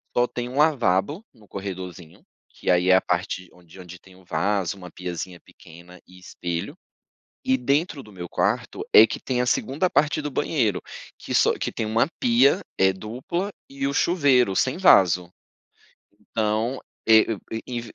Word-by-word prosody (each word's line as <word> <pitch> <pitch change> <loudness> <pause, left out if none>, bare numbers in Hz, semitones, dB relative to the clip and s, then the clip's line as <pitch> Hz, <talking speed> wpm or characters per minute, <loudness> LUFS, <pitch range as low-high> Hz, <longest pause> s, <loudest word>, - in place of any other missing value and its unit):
Só 120 - +4
tem 120 0 -5
1 125 +2 -7
lavabo 145 - +1
no 110 -4 -20
corredorzinho, 95 -4 -8 0.3
que - - -6
aí 90 +1 +2
é 95 - +7
a 95 - +4
parte 90 0 -3
onde 90 0 -17
onde 90 0 -11
tem 95 +1 -19
o 95 - -19
vaso, 100 -1 -1
uma 90 -2 -10
piazinha 90 0 -6
pequena 85 +2 -16
e 90 - -16
espelho. 85 -2 -5 0.7
E 130 - +2
dentro 140 +4 0
do 105 - -15
meu 90 -3 -8
quarto - - -1
é 110 - +10
que - - -5
tem 125 -2 -1
a - - 0
segunda 150 +9 0
parte 150 -1 +1
do 145 - -4
banheiro 120 - 0 0.4
que - - -6
só - - +4
que - - -3
tem 110 - -3
uma 110 +4 +2
pia 235 - +4 0.2
é 95 0 +5
dupla 125 - -4 0.2
e 135 0 -4
o 140 - -2
chuveiro 140 - +3
sem 130 - +1
vaso. 90 - +4 1.0
Então 110 +4 -1 0.3
é 110 -1 +7 0.4
em 120 -2 -4
105 Hz, 165 wpm, -24 LUFS, 90-135 Hz, 1.0 s, é